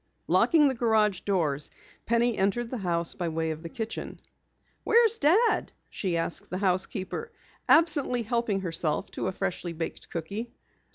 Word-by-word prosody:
Locking 310 -4 +4
the 270 - +1
garage 220 -5 +2
doors, 155 -8 0 0.4
Penny 235 0 +2
entered 230 +5 0
the 255 - -3
house 170 -3 0
by 175 -2 -3
way 160 0 -1
of 155 0 -6
the 165 - -7
kitchen. 225 +5 -5 0.6
"Where's 460 -1 +4
Dad?" 420 +10 +3 0.2
she 180 -4 -1
asked 165 +1 -2
the 180 - -3
housekeeper, 190 - -2 0.4
absently 295 -7 +4
helping 225 -3 -1
herself 165 -4 -2
to - - -3
a - - 0
freshly 185 -2 -3
baked 165 0 -6
cookie. 200 +8 -5
200 Hz, 150 wpm, -27 LUFS, 170-240 Hz, 0.6 s, Locking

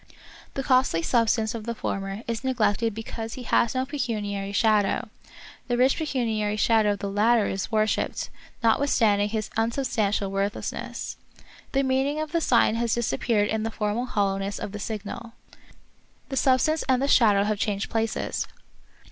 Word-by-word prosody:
The 270 - -2
costly 255 -11 +2
substance 225 -1 +2
of 225 -2 -6
the 235 0 -3
former 195 +1 -4
is 230 +1 -3
neglected 230 -4 +1
because 225 0 -6
he 255 - -7
has 235 0 +2
no 255 0 +1
pecuniary 210 -8 -3
shadow; 210 -1 +2 0.6
the 245 -1 0
rich 260 +2 +4
pecuniary 225 -9 -1
shadow 215 -1 +3
of - - -5
the 200 - -2
latter 215 +2 +3
is 190 +3 -3
worshipped, 215 -1 0 0.3
notwithstanding 220 -4 +3
his 215 -1 -3
unsubstantial 225 -4 0
worthlessness. 195 +1 -3 0.6
The 275 0 +2
meaning 270 +3 +1
of 310 -1 -3
the 335 0 +1
sign 235 -6 +4
has 235 -1 +1
disappeared 210 - 0
in 220 0 0
the 225 - -1
formal 220 +3 -2
hollowness 200 -2 -1
of - - -5
the 210 - -6
signal. 220 +2 -6 1.0
The 270 - -3
substance 270 +5 +3
and 255 -1 +4
the 275 - 0
shadow 210 -7 +5
have 210 0 -1
changed 205 -1 -1
places. 225 -1 -1
225 Hz, 155 wpm, -25 LUFS, 205-250 Hz, 1.0 s, shadow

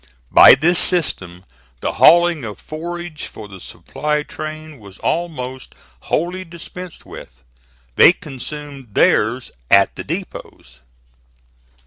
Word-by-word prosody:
By - - +9
this 165 +6 +2
system 95 - -1 0.4
the - - -1
hauling 175 -3 +4
of 105 -3 -7
forage 170 0 -7
for 110 - -11
the 95 -2 -12
supply 150 +9 -4
train 155 -1 -8
was 100 -2 -14
almost 130 -7 -4 0.2
wholly 180 +3 -2
dispensed 175 +1 -11
with. - - -13 0.5
They - - +8
consumed 135 -3 -9
theirs 120 +4 +2 0.2
at 100 0 +4
the - - -6
depots. 155 - -8
150 Hz, 110 wpm, -18 LUFS, 110-170 Hz, 0.5 s, By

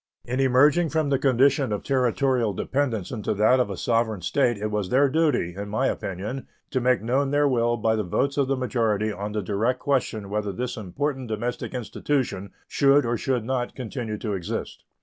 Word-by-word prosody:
In 125 +2 -2
emerging 145 +6 +4
from 155 -2 0
the 135 - +2
condition 135 -1 +3
of 105 - -2
Territorial 130 -3 +1
dependence 120 -3 -1
into 110 -5 -2
that 110 +5 +4
of 125 - +1
a 100 - -5
sovereign 115 -2 0
State 120 +5 +1
it 105 +1 -3
was 105 -3 -2
their 140 +3 +4
duty, 145 - +1
in 100 +1 -5
my 110 +6 0
opinion, 105 +5 -3 0.2
to 130 - 0
make 125 -2 +2
known 135 +4 +1
their 145 +1 +3
will 120 -2 +1
by 110 0 +1
the 110 - 0
votes 135 +10 0
of 140 -2 +1
the 135 0 0
majority 110 -4 0
on 105 0 -5
the 105 -1 -2
direct 110 +6 0
question 120 -8 -1
whether 105 -1 -1
this 125 +6 -4
important 130 +6 -3
domestic 120 +4 -3
institution 120 -5 -2 0.2
should 140 -1 +4
or 120 +1 0
should 125 0 -1
not 125 -1 -2
continue 115 -3 -4
to 105 -1 -3
exist. 90 -3 -5
120 Hz, 190 wpm, -25 LUFS, 105-135 Hz, 0.2 s, emerging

